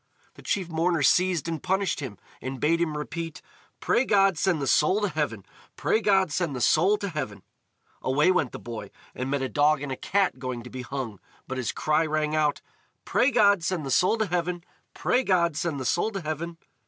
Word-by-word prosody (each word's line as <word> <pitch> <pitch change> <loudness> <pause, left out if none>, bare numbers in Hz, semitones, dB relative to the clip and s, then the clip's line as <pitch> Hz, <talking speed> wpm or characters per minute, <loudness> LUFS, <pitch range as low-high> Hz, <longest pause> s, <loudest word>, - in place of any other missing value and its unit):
The - - -15
chief 195 -6 -1
mourner 165 -1 +1
seized 180 -1 +3
and 165 -3 -3
punished 190 0 0
him, 130 -8 -6 0.2
and 130 0 -5
bade 165 +3 +2
him 155 -3 -1
repeat: 165 +2 -5 0.4
"Pray 240 - +2
God 195 -5 +3
send 170 0 +1
the 140 - -2
soul 155 +8 +3
to 205 - +1
heaven! 145 - -3 0.3
Pray 220 - +1
God 195 -5 +3
send 160 -3 -1
the - - -3
soul 185 +11 +4
to 200 -1 -4
heaven!" 105 - -5 0.6
Away 145 +7 +3
went 160 -8 +1
the - - -6
boy, 115 -2 -7 0.2
and 130 +1 -4
met 140 -1 0
a - - 0
dog 145 +5 +3
and 140 -1 -5
a - - -1
cat 190 -2 0
going 125 -2 -4
to 125 - -11
be 130 - -6
hung, 125 -5 -5 0.3
but 130 0 -4
his 125 - -1
cry 155 +1 +1
rang 155 -1 0
out: 150 -2 +1 0.4
"Pray 255 - +3
God 205 -7 +4
send 175 -4 -1
the 135 - -3
soul 180 - +3
to 220 - +1
heaven! 175 -1 -2 0.3
Pray 255 - +1
God 170 - +2
send 150 -2 -2
the 130 - -4
soul 175 - +1
to 195 - -3
heaven!" 165 +2 -4
160 Hz, 210 wpm, -26 LUFS, 140-185 Hz, 0.6 s, soul